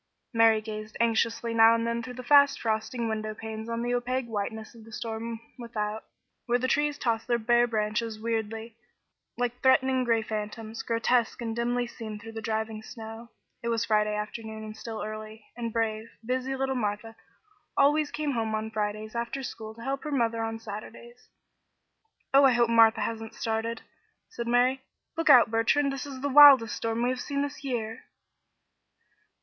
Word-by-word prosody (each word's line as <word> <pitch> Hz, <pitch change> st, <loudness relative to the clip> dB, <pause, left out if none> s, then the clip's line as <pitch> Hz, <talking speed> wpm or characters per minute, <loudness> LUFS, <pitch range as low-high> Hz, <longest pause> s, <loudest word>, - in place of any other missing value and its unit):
Mary 225 Hz, -1 st, +5 dB
gazed 215 Hz, 0 st, -7 dB
anxiously 230 Hz, 0 st, +1 dB
now 225 Hz, 0 st, +7 dB
and 230 Hz, 0 st, -1 dB
then 235 Hz, 0 st, -1 dB
through 250 Hz, +1 st, -8 dB
the 255 Hz, -, -7 dB
fast 280 Hz, +2 st, +5 dB
frosting 225 Hz, +2 st, -1 dB
window 215 Hz, -1 st, -3 dB
panes 220 Hz, +1 st, -7 dB
on 230 Hz, 0 st, -2 dB
the 245 Hz, 0 st, -1 dB
opaque 250 Hz, +1 st, -1 dB
whiteness 220 Hz, 0 st, -4 dB
of 230 Hz, -2 st, -14 dB
the 225 Hz, -, -14 dB
storm 225 Hz, 0 st, -5 dB, 0.2 s
without, 220 Hz, -2 st, -4 dB, 0.4 s
where 240 Hz, 0 st, +3 dB
the 255 Hz, +1 st, -1 dB
trees 295 Hz, +1 st, +1 dB
tossed 230 Hz, -1 st, -1 dB
their 240 Hz, -1 st, +2 dB
bare 240 Hz, +1 st, +3 dB
branches 215 Hz, 0 st, -2 dB
weirdly, 225 Hz, 0 st, -3 dB, 0.6 s
like 245 Hz, 0 st, -2 dB
threatening 260 Hz, 0 st, +4 dB
gray 230 Hz, -2 st, +2 dB
phantoms, 215 Hz, +1 st, -5 dB
grotesque 230 Hz, +1 st, +1 dB
and 225 Hz, -2 st, -3 dB
dimly 240 Hz, +1 st, 0 dB
seen 225 Hz, -3 st, -7 dB
through 225 Hz, +1 st, -10 dB
the 225 Hz, 0 st, -6 dB
driving 220 Hz, 0 st, -3 dB
snow. 225 Hz, +1 st, -9 dB, 0.3 s
It 235 Hz, -, -5 dB
was 230 Hz, -1 st, 0 dB
Friday 210 Hz, -1 st, +2 dB
afternoon 220 Hz, +1 st, -5 dB
and 215 Hz, 0 st, -8 dB
still 220 Hz, 0 st, -6 dB
early, 215 Hz, 0 st, -7 dB
and 235 Hz, -1 st, -4 dB
brave, 225 Hz, 0 st, -2 dB, 0.2 s
busy 255 Hz, +2 st, -1 dB
little 265 Hz, 0 st, -1 dB
Martha 225 Hz, -1 st, -3 dB, 0.6 s
always 295 Hz, +1 st, +4 dB
came 300 Hz, -1 st, -2 dB
home 225 Hz, -3 st, -1 dB
on 220 Hz, 0 st, -3 dB
Fridays 215 Hz, 0 st, -3 dB
after 235 Hz, +3 st, -3 dB
school 220 Hz, -3 st, -7 dB
to 230 Hz, -, -11 dB
help 270 Hz, +2 st, -3 dB
her 300 Hz, -, -4 dB
mother 230 Hz, -4 st, +1 dB
on 225 Hz, 0 st, -3 dB
Saturdays. 225 Hz, +3 st, -10 dB, 1.0 s
"Oh, 275 Hz, +1 st, +7 dB
I 265 Hz, -, +6 dB
hope 235 Hz, -1 st, +3 dB
Martha 225 Hz, -1 st, +6 dB
hasn't 225 Hz, 0 st, -4 dB
started," 225 Hz, +1 st, -2 dB, 0.5 s
said 235 Hz, -, -6 dB
Mary. 250 Hz, +2 st, +3 dB, 0.3 s
"Look 330 Hz, 0 st, 0 dB
out, 235 Hz, -3 st, +8 dB
Bertrand. 275 Hz, +5 st, +2 dB
This 275 Hz, +1 st, -5 dB
is 265 Hz, -2 st, -8 dB
the 285 Hz, -, 0 dB
wildest 275 Hz, -5 st, +8 dB
storm 230 Hz, +1 st, -2 dB
we 245 Hz, -, +2 dB
have 255 Hz, -1 st, -3 dB
had 280 Hz, -1 st, -2 dB
this 285 Hz, +1 st, -6 dB
year." 230 Hz, -4 st, -4 dB
230 Hz, 175 wpm, -28 LUFS, 220-245 Hz, 1.0 s, out